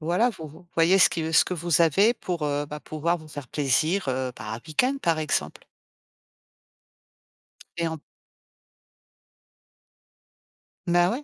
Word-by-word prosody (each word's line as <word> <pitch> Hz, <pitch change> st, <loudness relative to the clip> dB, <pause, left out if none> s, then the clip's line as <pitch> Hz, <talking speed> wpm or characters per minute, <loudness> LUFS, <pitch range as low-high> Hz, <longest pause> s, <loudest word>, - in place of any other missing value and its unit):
voilà, 180 Hz, +10 st, +2 dB
vo 160 Hz, -7 st, -9 dB
vo 165 Hz, +4 st, -16 dB
voyez 170 Hz, +4 st, +4 dB
ce -, -, +7 dB
qui 160 Hz, -1 st, -3 dB
ce -, -, +6 dB
que 185 Hz, -, -3 dB
vous 170 Hz, -1 st, +1 dB
avez 195 Hz, +8 st, +4 dB
pour, 175 Hz, -8 st, -5 dB
heu, 145 Hz, 0 st, -1 dB
bah, 150 Hz, +1 st, -7 dB
pouvoir 160 Hz, +3 st, -1 dB
vous 155 Hz, -2 st, -13 dB
faire 145 Hz, -3 st, -8 dB
plaisir, 155 Hz, +8 st, 0 dB
heu, 130 Hz, 0 st, -1 dB
par 105 Hz, -2 st, -7 dB
un 110 Hz, -, -4 dB
week-end 250 Hz, -, +1 dB
par 165 Hz, -6 st, +1 dB
exemple. 155 Hz, -, -2 dB, 2.2 s
Et 170 Hz, -1 st, 0 dB
en 160 Hz, -, -4 dB, 2.9 s
Mais 175 Hz, -1 st, +3 dB
ouais. 245 Hz, +10 st, -2 dB
165 Hz, 145 wpm, -25 LUFS, 150-175 Hz, 2.9 s, ce